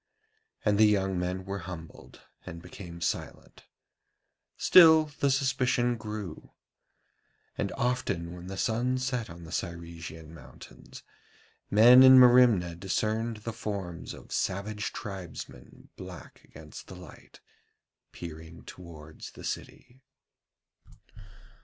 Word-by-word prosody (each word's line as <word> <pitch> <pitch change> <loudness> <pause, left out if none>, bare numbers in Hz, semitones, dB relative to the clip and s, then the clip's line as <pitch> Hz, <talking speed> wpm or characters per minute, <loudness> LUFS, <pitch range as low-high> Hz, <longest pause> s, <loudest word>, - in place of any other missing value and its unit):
And 105 -1 +2
the 110 - +7
young 95 -3 +1
men 90 +1 -3
were 100 0 -4
humbled 80 -3 -11 0.2
and 85 - -9
became 85 -1 -11
silent. 85 - -5 0.9
Still, 160 -3 +7
the 140 - +2
suspicion 130 -3 +1
grew. 105 -6 -8 1.0
And - - -3
often 90 -9 -2
when 90 0 -10
the 95 0 -7
sun 120 +5 0
set 125 -4 -3
on 85 0 -11
the 80 - -11
Cyresian 85 -2 -7
mountains, 75 -6 -14 0.7
men 120 +5 +8
in 130 0 +9
Merimna 120 -8 +6
discerned 110 +5 -2
the 115 - -5
forms 100 -7 -6
of - - -15
savage 100 +2 -2
tribesmen 90 - -9
black - - -11
against - - -12
the - - -10
light, 90 -6 -14 0.7
peering 80 0 -10
towards 80 -3 -11
the - - -12
city. 130 +2 -7
95 Hz, 110 wpm, -28 LUFS, 85-120 Hz, 1.0 s, in